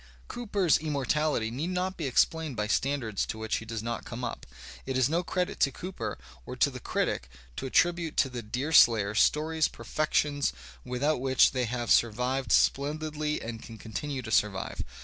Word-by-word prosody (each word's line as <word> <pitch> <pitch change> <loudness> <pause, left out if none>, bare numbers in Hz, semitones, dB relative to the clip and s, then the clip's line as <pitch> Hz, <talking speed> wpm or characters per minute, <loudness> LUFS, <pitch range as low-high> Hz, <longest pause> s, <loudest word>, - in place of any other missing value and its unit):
Cooper's 205 -8 +1
immortality 150 -5 0
need 145 +9 -3
not 185 +1 -1
be 160 -5 -3
explained 155 +2 +1
by 105 -1 -1
standards 115 -2 0
to - - -4
which 110 0 -1
he 110 - -7
does 115 -1 -5
not 115 -1 -3
come - - -7
up. - - -5 0.4
It 130 -1 -1
is 130 -2 +4
no 170 +3 +1
credit 180 0 -2
to 135 - +3
Cooper, 185 +8 -5 0.3
or - - -7
to - - +2
the - - -7
critic, 65 - -2 0.3
to - - -3
attribute 170 +2 +1
to 135 - +3
the 125 -1 -5
Deerslayer 115 -3 +4
stories 155 +7 +2
per - - -12
fections 150 -2 0 0.3
without 125 +3 0
which 130 -1 +4
they 130 -1 0
have 120 0 -2
survived 125 +4 +2
splendidly 150 +1 +1
and 115 -1 -6
can 115 -2 -10
continue 130 +5 -5
to 110 - -6
survive. 100 -3 0
135 Hz, 175 wpm, -29 LUFS, 115-155 Hz, 0.4 s, is